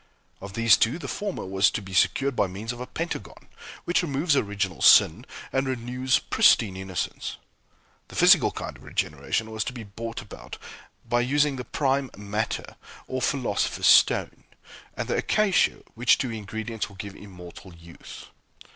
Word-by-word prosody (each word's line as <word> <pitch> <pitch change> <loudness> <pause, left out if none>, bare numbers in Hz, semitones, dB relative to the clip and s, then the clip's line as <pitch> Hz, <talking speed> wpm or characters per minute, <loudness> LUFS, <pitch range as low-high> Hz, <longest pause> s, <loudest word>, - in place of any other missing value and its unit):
Of 100 0 -8
these 115 -1 +5
two 115 +7 +1
the 175 - -7
former 205 -2 -4
was 95 +1 +3
to - - -3
be 95 -2 -10
secured 135 +7 +2
by 100 - +2
means 100 +5 -6
of 120 0 -8
a 125 - -6
Pentagon, 165 +1 -6 0.4
which 175 - +2
removes 150 -1 0
original 100 - -2
sin - - +6 0.3
and 135 0 0
renews 125 +1 0
pristine 100 -5 +3
innocence. 95 -2 -4 0.7
The - - -13
physical - - +6
kind - - -7
of - - -16
regeneration 75 +10 -2
was 110 -1 -2
to 125 - -4
be 120 -3 -8
brought 115 +3 -7
about 100 - -10 0.5
by 120 0 +2
using 145 +3 +1
the 125 -1 -6
"prime 135 -2 0
matter" 105 +2 -4 0.3
or 130 0 -4
philosopher's 125 -5 -1
stone, - - +4 0.5
and - - -3
the - - 0
"Acacia," 210 -3 +2
which 120 +2 +3
two 125 - -2
ingredients 110 +1 -5
will 100 - -15
give 100 +1 -8
immortal 90 -1 -12
youth. 85 0 -12
115 Hz, 160 wpm, -25 LUFS, 100-130 Hz, 0.7 s, sin